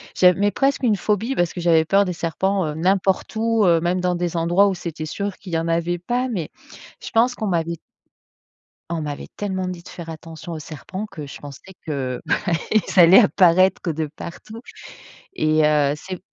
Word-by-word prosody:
J'av 180 Hz, -1 st, +5 dB
mais 205 Hz, +1 st, +2 dB
presque 275 Hz, +5 st, 0 dB
une 220 Hz, -4 st, +3 dB
phobie 215 Hz, +7 st, -1 dB
parce 175 Hz, -1 st, 0 dB
que 175 Hz, -, -5 dB
j'avais 165 Hz, -2 st, +4 dB
peur 200 Hz, +4 st, +3 dB
des 180 Hz, -, -2 dB
serpents, 185 Hz, +3 st, -1 dB
heu, 150 Hz, -, -4 dB
n'importe 190 Hz, +5 st, 0 dB
où, 225 Hz, -1 st, +2 dB
heu, 170 Hz, -2 st, +4 dB
même 180 Hz, +1 st, 0 dB
dans 180 Hz, -1 st, 0 dB
des 175 Hz, -1 st, -2 dB
endroits 175 Hz, +5 st, +3 dB
où 195 Hz, -, 0 dB
c'était 165 Hz, -3 st, -6 dB
sûr 200 Hz, +4 st, -4 dB
qu'il 180 Hz, -4 st, -10 dB
y -, -, +2 dB
en 165 Hz, -, -3 dB
avait 170 Hz, +1 st, 0 dB
pas. 245 Hz, +8 st, -1 dB
Mais 180 Hz, -10 st, -3 dB, 0.5 s
je -, -, -7 dB
pense 245 Hz, +2 st, +3 dB
qu'on 215 Hz, -, -3 dB
m'avait 170 Hz, -2 st, -1 dB, 1.1 s
on 165 Hz, -1 st, -2 dB
m'avait 145 Hz, -1 st, -5 dB
tellement 190 Hz, -2 st, -2 dB
dit 180 Hz, -2 st, -6 dB
de -, -, -16 dB
faire 170 Hz, -2 st, -9 dB
attention 160 Hz, +1 st, -9 dB
aux 155 Hz, -, -5 dB
serpents 165 Hz, -, -7 dB
que 150 Hz, -, -8 dB
je 140 Hz, -, -10 dB
pensais 145 Hz, +6 st, -11 dB
que, 130 Hz, -4 st, -3 dB
bah -, -, +2 dB, 0.4 s
ils 210 Hz, -3 st, +2 dB
allaient 175 Hz, +4 st, +9 dB
apparaître 185 Hz, -4 st, +4 dB
de 155 Hz, 0 st, -3 dB
partout 220 Hz, +6 st, -9 dB, 0.7 s
et 155 Hz, -, +2 dB
heu, 150 Hz, -2 st, +3 dB
c'est 185 Hz, +3 st, -8 dB
175 Hz, 200 wpm, -21 LUFS, 165-195 Hz, 1.1 s, allaient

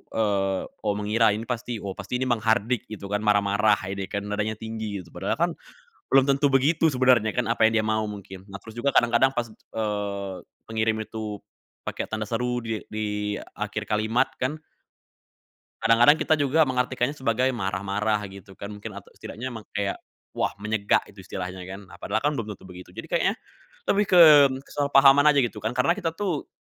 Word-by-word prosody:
eee, 100 Hz, -3 st, +1 dB, 0.2 s
"Oh," 105 Hz, -2 st, 0 dB
mengira, 110 Hz, +2 st, +3 dB
"ini 110 Hz, -, -5 dB
pasti 120 Hz, 0 st, -3 dB
oh, 100 Hz, -, -3 dB
pasti 125 Hz, -, -4 dB
ini 130 Hz, -, -1 dB
menghardik," 115 Hz, 0 st, +1 dB
gitu 105 Hz, -2 st, -7 dB
kan, 105 Hz, -, +1 dB
marah-marah 105 Hz, 0 st, +3 dB, 0.2 s
ini 100 Hz, -1 st, -4 dB
kan, 100 Hz, -, -3 dB
nadanya 105 Hz, +1 st, -2 dB
tinggi, 110 Hz, -3 st, -5 dB
gitu. 85 Hz, -, -19 dB
Padahal -, -, -2 dB
kan, -, -, +1 dB, 0.6 s
belum 135 Hz, 0 st, +6 dB
tentu 140 Hz, +1 st, +3 dB
begitu 155 Hz, +5 st, +3 dB
sebenarnya 125 Hz, -4 st, +3 dB
kan, 125 Hz, -2 st, 0 dB
apa 115 Hz, -1 st, +3 dB
yang 110 Hz, -, 0 dB
dia -, -, -3 dB
mau 110 Hz, 0 st, +1 dB
mungkin. 100 Hz, -2 st, -9 dB
Nah, 100 Hz, -, -7 dB
terus 110 Hz, +1 st, -12 dB
juga 140 Hz, +3 st, +1 dB
kadang-kadang 120 Hz, +3 st, +4 dB
pas, 120 Hz, -1 st, -1 dB
eee, 105 Hz, -3 st, -4 dB, 0.3 s
pengirim 110 Hz, 0 st, 0 dB
itu 110 Hz, -2 st, -6 dB, 0.4 s
pakai -, -, -4 dB
tanda 110 Hz, -1 st, -4 dB
seru 125 Hz, +1 st, -1 dB
di 115 Hz, -1 st, -3 dB, 0.2 s
di 105 Hz, -1 st, -2 dB, 0.2 s
akhir -, -, -4 dB
kalimat 110 Hz, +5 st, +1 dB
kan 145 Hz, +5 st, -2 dB, 1.2 s
kadang-kadang 120 Hz, +6 st, +6 dB
kita 160 Hz, -, +3 dB
juga 145 Hz, +2 st, +3 dB
mengartikannya 125 Hz, +1 st, 0 dB
sebagai 130 Hz, -1 st, +1 dB
marah-marah, 100 Hz, +1 st, -1 dB
gitu 95 Hz, 0 st, -13 dB
kan, 100 Hz, -, -6 dB
mungkin, 105 Hz, -, -8 dB
atau -, -, -15 dB
setidaknya 125 Hz, +4 st, -7 dB
emang 110 Hz, -2 st, -8 dB
kayak, 100 Hz, -1 st, -1 dB, 0.4 s
"Wah -, -, 0 dB
menyegak." 110 Hz, -1 st, +1 dB
gitu 95 Hz, -1 st, -13 dB
istilahnya, 90 Hz, 0 st, -6 dB
kan. 95 Hz, +2 st, -8 dB
Nah, -, -, -13 dB
padahal 110 Hz, -, -1 dB
kan 150 Hz, -, +3 dB
belum 110 Hz, -4 st, -4 dB
tentu -, -, -19 dB
begitu. 90 Hz, 0 st, -11 dB
Jadi -, -, -8 dB
kayaknya -, -, +1 dB, 0.6 s
lebih 205 Hz, +1 st, +3 dB
ke 175 Hz, -, +9 dB, 0.4 s
kesalahpahaman 140 Hz, 0 st, +5 dB
aja, 145 Hz, -1 st, +5 dB
gitu, 115 Hz, -, -3 dB
kan. 110 Hz, +2 st, -1 dB
Karena 130 Hz, +4 st, +3 dB
kita 165 Hz, -5 st, -2 dB
tuh 180 Hz, -6 st, -2 dB
110 Hz, 180 wpm, -25 LUFS, 105-125 Hz, 1.2 s, ke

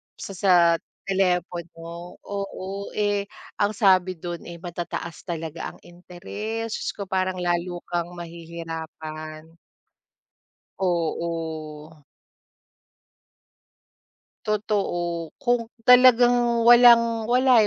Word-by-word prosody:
sa -, -, -8 dB
sa 185 Hz, 0 st, +3 dB, 0.5 s
telepono. 175 Hz, -2 st, -2 dB
Oo, 200 Hz, 0 st, -6 dB
eh, 205 Hz, -1 st, 0 dB, 0.3 s
ang 205 Hz, +1 st, +1 dB
sabi 185 Hz, -3 st, +3 dB
dun, 170 Hz, +1 st, -6 dB
eh, 170 Hz, -, -7 dB
matataas 170 Hz, 0 st, -6 dB
talaga 165 Hz, -1 st, -4 dB
ang -, -, -19 dB
interes. 205 Hz, +6 st, -6 dB
Diyos -, -, -2 dB
ko, 200 Hz, -, -5 dB
parang 185 Hz, 0 st, 0 dB
lalo 175 Hz, 0 st, -1 dB
kang 170 Hz, -1 st, -1 dB
mahihirapan. 160 Hz, -2 st, -8 dB, 1.3 s
Oo. 160 Hz, -3 st, -2 dB, 2.6 s
Totoo, 175 Hz, -6 st, -1 dB
kung 240 Hz, -2 st, +1 dB, 0.2 s
talagang 245 Hz, -1 st, +6 dB
walang 235 Hz, -1 st, +6 dB
wala, 250 Hz, -2 st, +5 dB
180 Hz, 85 wpm, -24 LUFS, 170-215 Hz, 2.6 s, talagang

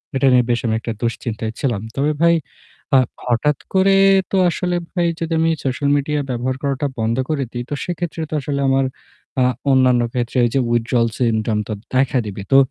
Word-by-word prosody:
এটা 135 Hz, +1 st, +3 dB
নিয়ে 125 Hz, -1 st, +5 dB
বেশ 120 Hz, -1 st, +2 dB
আমি 110 Hz, -, +1 dB
একটা 115 Hz, -, -4 dB
দুশ্চিন্তায় 115 Hz, -1 st, -3 dB
ছিলাম। 120 Hz, -8 st, -1 dB
তবে 145 Hz, +2 st, +1 dB
ভাই 170 Hz, 0 st, +5 dB, 0.6 s
আ -, -, +8 dB, 0.3 s
হঠাৎ 125 Hz, +4 st, +1 dB, 0.2 s
করে 195 Hz, +1 st, +4 dB, 0.4 s
তো 195 Hz, -, +2 dB
আসলে 180 Hz, +1 st, -1 dB, 0.2 s
ভাই 175 Hz, -2 st, +1 dB
যদি 165 Hz, 0 st, -2 dB
আমি 165 Hz, -, +3 dB, 0.2 s
social 140 Hz, +2 st, 0 dB
media 150 Hz, +1 st, -1 dB
ব্যবহার 125 Hz, +1 st, -1 dB
করাটা 140 Hz, 0 st, 0 dB
বন্ধ 115 Hz, +1 st, 0 dB
করে 150 Hz, -3 st, 0 dB
দিই 120 Hz, 0 st, -4 dB
তো -, -, -3 dB
সেক্ষেত্রে 175 Hz, -2 st, -4 dB
তো -, -, -7 dB
আসলে 140 Hz, 0 st, -2 dB
আমার 135 Hz, 0 st, +2 dB, 0.6 s
আ -, -, +5 dB, 0.3 s
অন্যান্য 130 Hz, -2 st, +4 dB
ক্ষেত্রে 120 Hz, +1 st, -2 dB
ওই -, -, +1 dB
যে 135 Hz, -, +4 dB
withdrawal 120 Hz, 0 st, +2 dB
syndrome 110 Hz, -3 st, +1 dB
তো 110 Hz, -, -3 dB, 0.2 s
দেখা 130 Hz, 0 st, +2 dB
দিবে। 100 Hz, -1 st, -6 dB
তো -, -, +8 dB
130 Hz, 190 wpm, -19 LUFS, 120-150 Hz, 0.6 s, আ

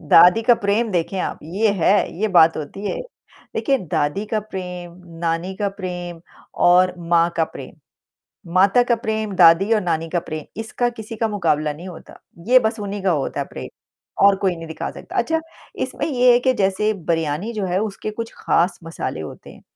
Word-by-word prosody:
दादी 175 Hz, +7 st, +6 dB
का 240 Hz, +2 st, +5 dB
प्रेम 215 Hz, +2 st, 0 dB
देखें 180 Hz, +1 st, -1 dB
आप, -, -, -3 dB
ये 200 Hz, +7 st, 0 dB
है, 200 Hz, +2 st, +2 dB
ये 220 Hz, -, +2 dB
बात 165 Hz, -4 st, +5 dB
होती 160 Hz, +7 st, -6 dB
है। -, -, -3 dB, 0.6 s
देखिए, 275 Hz, -1 st, +1 dB
दादी 170 Hz, 0 st, -1 dB
का 215 Hz, 0 st, -1 dB
प्रेम, 180 Hz, -4 st, -7 dB, 0.3 s
नानी 170 Hz, +2 st, -1 dB
का 205 Hz, 0 st, 0 dB
प्रेम 180 Hz, -3 st, -6 dB, 0.5 s
और 180 Hz, +1 st, +5 dB
माँ 170 Hz, 0 st, +2 dB
का 165 Hz, -, +3 dB
प्रेम, -, -, -10 dB, 0.8 s
माता 195 Hz, +6 st, +5 dB
का 240 Hz, -1 st, +2 dB
प्रेम, 220 Hz, -2 st, -3 dB
दादी 175 Hz, +4 st, +6 dB
और 215 Hz, -, +2 dB
नानी 165 Hz, -3 st, -1 dB
का 175 Hz, -, 0 dB
प्रे 155 Hz, -2 st, -7 dB
इसका 225 Hz, +2 st, -1 dB
किसी 225 Hz, -1 st, -8 dB
का 225 Hz, +1 st, 0 dB
मुकाबला 155 Hz, -8 st, 0 dB
नहीं 170 Hz, +5 st, -10 dB
होता। 175 Hz, -3 st, -12 dB, 0.3 s
ये 255 Hz, +1 st, +7 dB
बस 225 Hz, -1 st, -1 dB
उन्हीं 205 Hz, 0 st, -4 dB
का 190 Hz, -, +3 dB
होता 145 Hz, -5 st, -2 dB
है -, -, -1 dB
प्रे -, -, -7 dB, 0.5 s
और 200 Hz, 0 st, +6 dB
कोई 185 Hz, -2 st, +1 dB
नहीं 165 Hz, 0 st, -8 dB
दिखा 160 Hz, -, -5 dB
सकता, -, -, -11 dB
अच्छा 325 Hz, 0 st, +1 dB, 0.4 s
इसमें -, -, -3 dB
ये 250 Hz, -4 st, +4 dB
है 240 Hz, -, +5 dB
कि 260 Hz, +1 st, +2 dB
जैसे 200 Hz, 0 st, +1 dB
बिरयानी 165 Hz, +1 st, -2 dB
जो 210 Hz, -3 st, -2 dB
है, 180 Hz, 0 st, 0 dB
उसके 215 Hz, 0 st, -4 dB
कुछ 230 Hz, +2 st, -6 dB
ख़ास 175 Hz, +3 st, +1 dB
मसाले 165 Hz, -, -5 dB
होते 80 Hz, -, -9 dB
हैं। -, -, -16 dB
190 Hz, 190 wpm, -21 LUFS, 170-215 Hz, 0.8 s, ये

